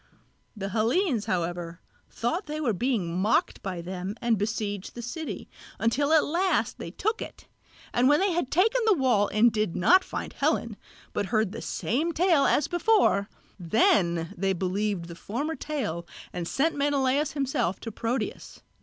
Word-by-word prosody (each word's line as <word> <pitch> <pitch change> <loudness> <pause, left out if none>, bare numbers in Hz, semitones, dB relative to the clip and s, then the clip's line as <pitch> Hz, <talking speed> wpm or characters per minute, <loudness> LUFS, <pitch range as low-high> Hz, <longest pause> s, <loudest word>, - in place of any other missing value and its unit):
The 195 -1 -3
Hellenes 230 - +1
however 175 -1 -2 0.3
thought 325 - -2
that 300 - -5
they 305 - -3
were 255 -8 +1
being 200 -6 -1
mocked 215 +4 +1
by 185 -3 -4
them 185 +3 -5
and 235 -1 +2
besieged 205 -1 -3
the 240 - -5
city, 310 +7 -5 0.3
until 280 +6 +1
at 315 -2 +5
last 360 +5 0
they - - -5
took 440 +3 -2
it; - - -9 0.5
and 250 +2 +4
when 295 - +5
they 390 0 +2
had 340 -6 -1
taken 440 - +3
the 425 - +6
wall 245 - +3
and 225 +3 +4
did 215 -4 -1
not 370 - +5
find - - -5
Helen, - - 0 0.4
but 205 -1 -1
heard 215 -3 +1
the - - -6
same 315 +9 -1
tale 330 -4 +3
as 295 - +2
before, 350 - +2 0.3
then 170 -3 +2
they 195 +1 0
believed 190 0 -1
the 170 - -8
former 245 - -3
tale 250 - -4 0.3
and 175 -2 -4
sent 315 - +1
Menelaos 280 0 +1
himself 270 - -1
to 225 - -5
Proteus. 230 +4 -4
230 Hz, 165 wpm, -27 LUFS, 195-300 Hz, 0.5 s, the